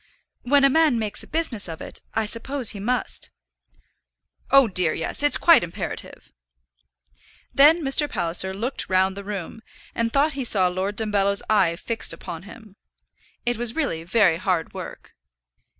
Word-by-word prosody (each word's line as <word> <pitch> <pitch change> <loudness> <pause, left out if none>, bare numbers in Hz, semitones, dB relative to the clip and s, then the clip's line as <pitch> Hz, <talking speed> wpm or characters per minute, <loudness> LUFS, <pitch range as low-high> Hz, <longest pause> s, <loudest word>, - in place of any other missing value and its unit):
"When 280 +3 +3
a 275 - +6
man 315 -4 +3
makes 215 -2 -4
a - - -13
business 260 -12 -3
of 160 - -7
it, - - -7
I 220 - +1
suppose 245 +3 -1
he 205 - -8
must." 245 +4 -3 1.2
"Oh, 275 -2 +6
dear, 180 -5 +1
yes; 165 - -3
it's 290 0 +5
quite 335 - +5
imperative." 170 - -7 1.2
Then 310 +4 +5
Mr. 290 +2 +3
Palliser 180 -1 -1
looked 230 +8 -1
round 190 0 +2
the 200 - -8
room, 200 +1 -7 0.3
and 230 0 -1
thought 285 +4 +2
he 270 -1 -4
saw 190 -6 +4
Lord 190 +3 -3
Dumbello's 200 -2 +1
eye 190 -6 +3
fixed 225 +6 -4
upon 170 -3 -8
him. 215 -3 -15 0.7
It 240 -1 0
was 235 0 -2
really 255 - -2
very 185 -2 +2
hard 180 -2 -2
work. - - -9
215 Hz, 155 wpm, -23 LUFS, 190-265 Hz, 1.2 s, a